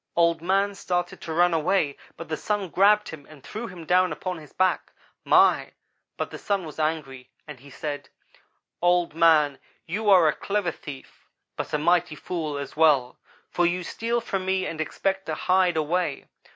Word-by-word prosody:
Old 170 -1 +3
man 195 +3 +1
started 175 -2 -3
to 165 - -6
run 175 +2 +3
away 160 -2 +1 0.2
but 165 - -8
the 155 - -2
Sun 205 +1 -2
grabbed 205 +4 +4
him 150 -3 -10
and 150 -4 -15
threw 230 +2 -6
him 180 -3 -10
down 180 +2 +3
upon 180 -2 -4
his 150 - -14
back. 185 0 0 0.3
My! - - +4 0.4
but - - -3
the - - -8
Sun 200 -3 -1
was 155 0 -9
angry, 150 -5 -3 0.2
and 150 -4 -9
he 140 +3 -15
said: 145 +1 -6 0.7
"'Old 175 -2 +2
man, 155 -4 +4 0.3
you 205 +5 -1
are 180 -5 +7
a 150 - +3
clever 200 -3 -1
thief 140 -4 -12 0.3
but - - -5
a - - +1
mighty 170 +1 +2
fool 155 -3 -4
as 140 -1 -6
well, 145 -6 +3 0.3
for 175 0 +2
you 180 +1 -1
steal 230 +6 -2
from 195 -4 -3
me 190 0 0
and 160 -1 -4
expect 195 +4 -2
to 155 - -2
hide 180 0 +2
away. 160 -1 -1
170 Hz, 180 wpm, -25 LUFS, 155-185 Hz, 0.7 s, are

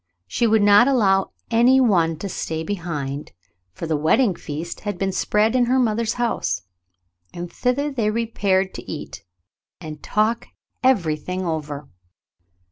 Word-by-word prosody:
She 230 - 0
would 220 -1 +3
not 205 +4 +7
allow 195 -8 +3 0.2
any 240 +3 +5
one 170 -10 +3
to 200 - -5
stay 160 -3 -4
behind, 150 -7 -4 0.4
for 135 - -6
the 160 -1 0
wedding 190 - +3
feast 165 +1 -6
had 205 -3 -4
been 195 +1 -1
spread 215 +5 +1
in 250 -1 +4
her 255 +2 +2
mother's 230 -2 +1
house, 95 - -1 0.7
and 175 0 -7
thither 280 +4 0
they 230 -6 0
repaired 200 -4 0
to - - -8
eat, - - -7 0.6
and 155 -4 -8
talk 215 +2 0 0.4
everything 180 - +1
over. 150 -3 -4
195 Hz, 140 wpm, -22 LUFS, 160-230 Hz, 0.7 s, not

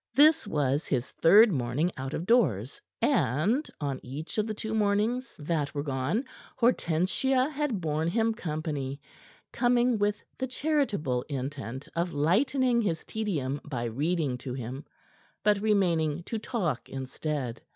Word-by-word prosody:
This 305 -1 +6
was 145 -4 0
his 125 -3 -1
third 205 +7 +6
morning 135 +4 0
out 135 +2 -4
of 170 - -3
doors, 140 - +2 0.2
and 195 - +2
on 140 -3 -2
each 150 - -5
of 215 - +1
the 215 - -2
two 220 +1 -4
mornings 220 +4 +1
that 150 -2 -2
were 145 - -1
gone 145 - -1 0.3
Hortensia 250 - +2
had 290 -7 -1
borne 155 0 0
him 225 +5 +1
company, 150 -6 -4 0.5
coming 240 -1 +3
with 205 0 +2 0.2
the 260 - -1
charitable 255 - 0
intent 135 -1 -5
of 170 +1 -1
lightening 240 - +2
his 175 -7 -1
tedium 150 -11 -2
by 125 -5 -4
reading 140 +2 -1
to 125 0 -5
him, 130 +3 -6 0.6
but 205 -1 +3
remaining 175 -7 +2
to 225 +5 -4
talk 180 - -2
instead. 135 -2 -4
165 Hz, 140 wpm, -28 LUFS, 140-225 Hz, 0.6 s, This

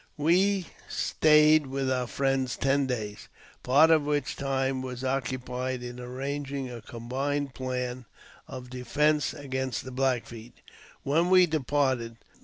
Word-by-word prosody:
We 185 +5 +2 0.2
stayed 150 -1 +4
with 135 0 -2
our 125 -1 0
friends 135 -1 0
ten 135 0 +1
days, 110 -5 -4 0.3
part 145 +6 +5
of 160 -1 +5
which 145 -2 -1
time 135 -1 -1
was 130 -1 -6
occupied 130 -1 -2
in 120 0 -7
arranging 135 +1 -4
a 120 -1 -8
combined 135 +5 -3
plan 125 -1 -4 0.4
of 125 -1 -9
defence 145 +4 +1
against 130 -3 -3
the 130 - -7
Black 130 -2 0
Feet. 115 0 -12 0.4
When 165 +6 +2
we 185 -1 +7
departed. 130 -6 0
130 Hz, 130 wpm, -28 LUFS, 125-145 Hz, 0.4 s, we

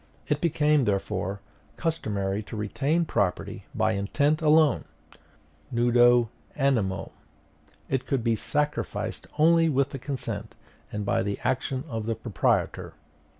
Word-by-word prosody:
It 150 -1 0
became, 150 -4 +3
therefore, 100 -1 -1 0.4
customary 105 - -1
to 110 - -7
retain 140 +11 0
property 90 - -1
by - - +2
intent 145 +11 +1
alone 155 -2 +4 0.9
nudo 120 0 +4 0.3
animo; 115 -10 0 0.8
it 135 -1 -2
could 135 -5 0
be 115 -1 +2
sacrificed 150 +6 -2
only 165 +1 +5
with 140 -1 +2
the 135 - -5
consent 115 -5 -5 0.4
and 105 -1 -3
by - - +1
the 100 0 -2
action 130 0 -1
of 115 -5 -4
the 115 - 0
proprietor. 110 -1 -1
120 Hz, 120 wpm, -27 LUFS, 105-150 Hz, 0.9 s, only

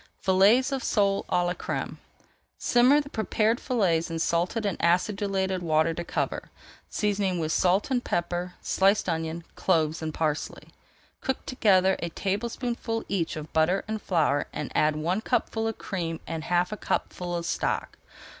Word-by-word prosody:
FILLETS 205 +8 +4
OF 270 -2 -2
SOLE 200 -2 +1
À 175 - +2
LA 175 - 0
CRÈME - - -4 0.6
Simmer 255 +5 +4
the 285 - -10
prepared 220 +2 +1
fillets 185 -11 +1
in 165 - -3
salted 175 +7 0
and 200 - 0
acidulated 190 +1 +1
water 160 -1 +2
to 175 - -4
cover, - - -3 0.4
seasoning 200 -3 0
with 160 -2 -1
salt 185 - +2
and 250 -2 +1
pepper, 175 +1 -2
sliced 195 +2 +2
onion, 165 0 -2
cloves, 160 -3 +1
and 160 -1 -3
parsley. 155 -1 -3 0.5
Cook 265 - -3
together 190 -6 +3
a 170 - -3
tablespoonful 225 +5 -2
each 175 -5 -1
of 155 0 -8
butter 160 +5 +2
and 220 -1 -3
flour 150 -5 +1
and - - -5
add 155 0 +3
one 170 +7 -1
cupful 225 -2 0
of 225 - -3
cream 165 -4 -4
and 160 -1 -5
half 175 +1 +1
a 215 - -4
cupful 175 -2 -2
of 170 -1 -3
stock. - - -2
185 Hz, 155 wpm, -27 LUFS, 165-215 Hz, 0.6 s, FILLETS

